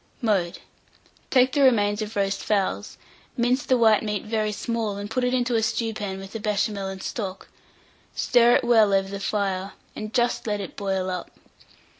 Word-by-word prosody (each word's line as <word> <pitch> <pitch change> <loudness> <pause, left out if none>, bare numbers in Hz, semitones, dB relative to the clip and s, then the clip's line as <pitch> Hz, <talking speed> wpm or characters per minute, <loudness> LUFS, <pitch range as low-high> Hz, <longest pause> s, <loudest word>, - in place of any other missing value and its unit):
Mode. 195 -8 0 0.7
Take 255 -1 +4
the 285 - +2
remains 210 -5 +3
of 215 +1 -5
roast 195 -1 0
fowls, 200 -3 -1 0.4
mince 250 +3 +2
the 260 -3 +2
white 220 -3 +5
meat 210 -1 -3
very 215 -1 -1
small, 220 -1 -2
and 205 +1 -6
put 255 +2 0
it 250 - +1
into 250 -1 0
a 225 - +2
stewpan 220 -3 -2
with 195 0 -9
the 225 - -5
Béchamel 205 -2 -1
and 190 0 -8
stock; 195 -4 -5 0.7
stir 240 -1 +4
it - - +2
well 220 -4 +4
over 195 0 +1
the 200 0 -5
fire, 195 -1 -2 0.2
and 215 0 -6
just 240 -1 0
let 210 -1 -1
it 195 - -7
boil 190 -2 -2
up. 180 -1 -5
210 Hz, 180 wpm, -24 LUFS, 195-235 Hz, 0.7 s, white